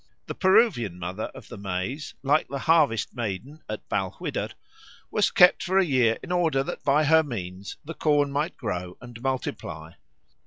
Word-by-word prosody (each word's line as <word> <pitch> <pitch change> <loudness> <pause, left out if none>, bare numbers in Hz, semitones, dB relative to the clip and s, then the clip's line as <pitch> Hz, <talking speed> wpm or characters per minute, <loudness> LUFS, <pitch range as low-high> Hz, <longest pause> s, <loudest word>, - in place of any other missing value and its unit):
The - - -5
Peruvian 190 - +3
Mother 90 +4 -4
of - - -11
the - - -9
Maize, 100 +10 -4
like 145 +3 +2
the 140 - -4
harvest 145 -7 +2
Maiden 120 +6 -5
at - - -6
Balquhidder, - - -2 0.6
was 210 - +3
kept 180 -1 +6
for 190 +1 0
a 195 - +5
year 125 -7 +3
in - - -7
order 165 -6 +2
that - - -6
by 145 +2 +3
her 160 +2 +6
means 100 - -6
the 165 - -6
corn 145 -3 +2
might 145 +4 -2
grow 90 -5 -4
and 120 -1 -11
multiply. 125 - -4
135 Hz, 165 wpm, -26 LUFS, 105-155 Hz, 0.6 s, kept